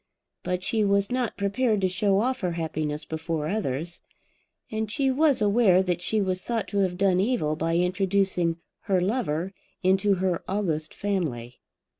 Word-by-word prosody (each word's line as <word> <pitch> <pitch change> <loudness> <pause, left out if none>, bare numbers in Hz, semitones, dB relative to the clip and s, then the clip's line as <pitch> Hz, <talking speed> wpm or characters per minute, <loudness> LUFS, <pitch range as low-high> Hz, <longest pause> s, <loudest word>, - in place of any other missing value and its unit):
But 180 0 -2
she 220 +1 +1
was 200 +2 +2
not 250 -2 -1
prepared 210 +2 +1
to 190 - +3
show 195 +2 +1
off 255 +2 0
her 180 -3 -1
happiness 155 -2 -3
before 160 -1 -3
others. 170 -3 -2 0.7
And 220 -1 -2
she 270 +2 +1
was 280 -4 +3
aware 200 -3 +4
that 180 -2 -1
she 215 +4 0
was 185 -1 0
thought 230 0 -2
to 200 - -1
have 185 -2 +1
done 190 -1 +3
evil 195 -8 +1
by 165 +1 0
introducing 180 -2 +1 0.3
her 195 -3 +2
lover 185 -3 -1 0.3
into 190 +2 +3
her 185 -2 -1
august 165 -6 -1
family. 140 -12 -3
190 Hz, 160 wpm, -26 LUFS, 170-210 Hz, 0.7 s, aware